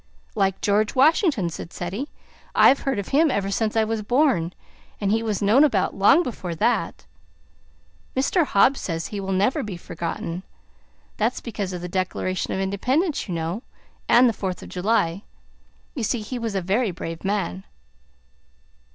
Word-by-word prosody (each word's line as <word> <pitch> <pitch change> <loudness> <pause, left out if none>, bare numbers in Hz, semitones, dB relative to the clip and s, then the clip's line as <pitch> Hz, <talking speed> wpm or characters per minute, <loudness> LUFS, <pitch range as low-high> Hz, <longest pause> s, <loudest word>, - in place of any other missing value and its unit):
"Like 195 -2 0
George 210 +1 +1
Washington," 275 - +3
said 165 - -8
Ceddie. 195 +11 -4 0.5
"I've 275 - +6
heard 270 -4 -1
of 200 - -4
him 305 +3 +4
ever 200 -6 -1
since 220 +1 0
I 225 - +4
was 220 0 -2
born, 240 - +2 0.5
and 200 -1 0
he 225 +1 +2
was 215 -3 -2
known 225 +8 +5
about, 220 -11 +2
long 210 - +5
before 185 - -5
that. 240 +9 0 1.1
Mr. 305 +6 +3
Hobbs 265 +1 +3
says 165 -2 -3
he 205 - -5
will 195 0 -3
never 195 +7 +2
be 200 -4 -5
forgotten. 170 0 -5 0.8
That's 225 +4 0
because 205 -5 -4
of 180 -1 -5
the 180 - -4
Declaration 185 0 -2
of - - -1
Independence, 255 - 0
you 180 - -3
know, 165 +6 -3 0.5
and 245 +1 +7
the 230 - +2
Fourth 190 -3 -4
of - - -10
July. 185 -2 0 0.7
You 270 - -4
see, 225 +1 0
he 245 +4 -5
was 225 -3 -3
a 190 - +1
very 205 +6 +1
brave 165 -2 -6
man." 195 - -2
205 Hz, 165 wpm, -23 LUFS, 185-245 Hz, 1.1 s, and